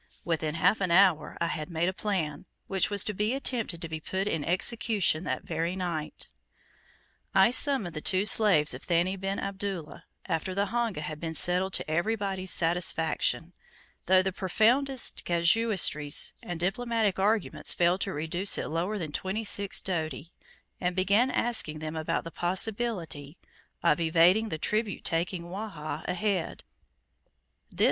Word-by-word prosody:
Within 160 Hz, -2 st, -1 dB
half 195 Hz, +5 st, +3 dB
an 190 Hz, -, +1 dB
hour, 175 Hz, -3 st, +4 dB
I -, -, +1 dB
had 160 Hz, -1 st, -3 dB
made 170 Hz, 0 st, 0 dB
a 185 Hz, -, 0 dB
plan, 180 Hz, -7 st, -3 dB, 0.2 s
which 190 Hz, -2 st, +1 dB
was 205 Hz, -2 st, +4 dB
to 210 Hz, -, -2 dB
be 210 Hz, +5 st, 0 dB
attempted 230 Hz, -10 st, -2 dB
to -, -, -3 dB
be 160 Hz, 0 st, -5 dB
put 190 Hz, +5 st, -3 dB
in 160 Hz, -7 st, -1 dB
execution 185 Hz, -1 st, 0 dB
that -, -, -2 dB
very 165 Hz, +2 st, -2 dB
night. 170 Hz, -5 st, -4 dB, 1.1 s
I 195 Hz, +4 st, +6 dB
summoned 255 Hz, -, +1 dB
the 155 Hz, -, -4 dB
two 190 Hz, +4 st, +2 dB
slaves 185 Hz, -, +3 dB
of 130 Hz, -, -7 dB
Thani 175 Hz, +2 st, +1 dB
bin 195 Hz, +1 st, -3 dB
Abdullah, 190 Hz, -5 st, -5 dB, 0.2 s
after 165 Hz, +3 st, -2 dB
the 200 Hz, +1 st, +1 dB
honga 230 Hz, -6 st, -1 dB
had 155 Hz, 0 st, -5 dB
been 160 Hz, 0 st, -4 dB
settled 180 Hz, +3 st, +2 dB
to -, -, 0 dB
everybody's 190 Hz, +3 st, -1 dB
satisfaction 165 Hz, 0 st, +1 dB, 0.5 s
though 185 Hz, +1 st, +5 dB
the 190 Hz, -, -1 dB
profoundest 240 Hz, +8 st, +1 dB
casuistries 170 Hz, -4 st, +2 dB
and 175 Hz, -2 st, -6 dB
diplomatic 215 Hz, +2 st, 0 dB
arguments 195 Hz, -6 st, 0 dB
failed 175 Hz, +2 st, +2 dB
to 195 Hz, -, -1 dB
reduce 175 Hz, +5 st, 0 dB
it -, -, -3 dB
lower 175 Hz, +7 st, -1 dB
than 160 Hz, -6 st, -4 dB
twenty 190 Hz, +8 st, -2 dB
six 200 Hz, -2 st, +1 dB
doti 165 Hz, -2 st, -4 dB, 0.5 s
and 180 Hz, -1 st, -1 dB
began 200 Hz, +7 st, +3 dB
asking 230 Hz, -12 st, 0 dB
them 155 Hz, +1 st, -5 dB
about 160 Hz, +1 st, -1 dB
the 165 Hz, -, -8 dB
possibility 180 Hz, -5 st, -2 dB, 0.5 s
of 170 Hz, -1 st, +3 dB
evading 175 Hz, +7 st, +4 dB
the 160 Hz, -, -3 dB
tribute 215 Hz, +5 st, -1 dB
taking 170 Hz, +1 st, -1 dB
Wahha 180 Hz, -3 st, -6 dB
ahead. 195 Hz, -2 st, -1 dB
185 Hz, 150 wpm, -28 LUFS, 165-205 Hz, 1.1 s, I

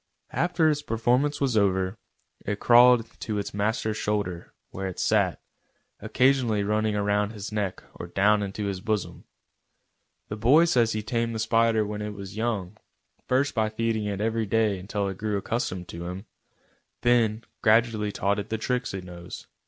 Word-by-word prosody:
After 175 Hz, -2 st, +2 dB
its 150 Hz, -1 st, +1 dB
performance 125 Hz, +3 st, +1 dB
was 135 Hz, -4 st, 0 dB
over, 95 Hz, -2 st, +2 dB, 0.5 s
it 105 Hz, 0 st, -3 dB
crawled 120 Hz, -1 st, +6 dB
to 110 Hz, -4 st, -3 dB
its 100 Hz, -, -4 dB
master's 110 Hz, +1 st, -1 dB
shoulder, 100 Hz, -5 st, -2 dB, 0.2 s
where 95 Hz, 0 st, -4 dB
it 95 Hz, -, -6 dB
sat, -, -, +2 dB, 0.6 s
occasionally 125 Hz, -5 st, +2 dB
running 105 Hz, +1 st, 0 dB
round 105 Hz, +1 st, 0 dB
his 105 Hz, -1 st, -7 dB
neck 105 Hz, -3 st, -3 dB
or -, -, -8 dB
down 105 Hz, +4 st, +3 dB
into 100 Hz, +1 st, -4 dB
his 95 Hz, -2 st, -3 dB
bosom. 105 Hz, -1 st, -3 dB, 1.0 s
The 105 Hz, -, -5 dB
boy 135 Hz, +10 st, +5 dB
says 120 Hz, -8 st, +2 dB
he 110 Hz, 0 st, -3 dB
tamed 115 Hz, +1 st, -1 dB
the -, -, -3 dB
spider 115 Hz, 0 st, +2 dB
when 105 Hz, 0 st, -5 dB
it 105 Hz, 0 st, -5 dB
was 100 Hz, -1 st, -8 dB
young, 110 Hz, -4 st, -2 dB, 0.5 s
first 135 Hz, +3 st, +1 dB
by 110 Hz, -2 st, +1 dB
feeding 110 Hz, -1 st, -1 dB
it 100 Hz, -1 st, -3 dB
every 110 Hz, 0 st, 0 dB
day 105 Hz, -2 st, +1 dB
until 100 Hz, +2 st, -3 dB
it 95 Hz, -1 st, -6 dB
grew 105 Hz, -1 st, -1 dB
accustomed 95 Hz, -4 st, -3 dB
to 85 Hz, +1 st, -6 dB
him, 95 Hz, +4 st, -6 dB, 0.8 s
then 115 Hz, -2 st, +2 dB, 0.2 s
gradually 110 Hz, -2 st, +3 dB
taught 100 Hz, +1 st, 0 dB
it 105 Hz, -, -6 dB
the 110 Hz, -, -1 dB
tricks 125 Hz, -1 st, -2 dB
it 95 Hz, -, -5 dB
knows. 90 Hz, 0 st, -9 dB
105 Hz, 170 wpm, -26 LUFS, 100-115 Hz, 1.0 s, crawled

